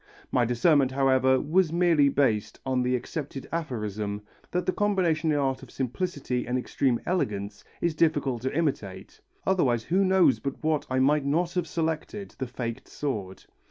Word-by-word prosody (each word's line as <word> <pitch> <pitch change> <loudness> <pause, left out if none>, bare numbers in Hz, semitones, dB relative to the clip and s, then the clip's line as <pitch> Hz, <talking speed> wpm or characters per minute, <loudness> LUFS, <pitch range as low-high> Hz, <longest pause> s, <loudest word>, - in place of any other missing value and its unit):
My 125 - +3
discernment, 130 +3 +3
however, 130 -1 +3
was 165 +2 +2
merely 165 -4 +4
based 130 -7 0
on 130 -1 +1
the 125 0 +1
accepted 135 +2 -5
aphorism 105 -9 -3 0.3
that 180 0 -1
the - - +2
combination 175 -6 +1
in 150 - +2
art 135 -2 0
of 135 - -12
simplicity 130 -1 -3
and 125 +1 0
extreme 125 -1 0
elegance 105 - -2 0.2
is 170 -1 +1
difficult 145 -6 +1
to 130 +2 -1
imitate, 135 - -3 0.2
otherwise 130 -12 +2
who 185 +8 +2
knows 190 -1 +4
but 140 +1 -5
what 155 -1 0
I 130 - 0
might 140 +3 +3
not 170 +5 0
have 180 -3 -1
selected 165 +6 -3
the 130 - -2
faked 115 -1 -5
sword. 105 -10 -4
140 Hz, 160 wpm, -27 LUFS, 125-165 Hz, 0.3 s, merely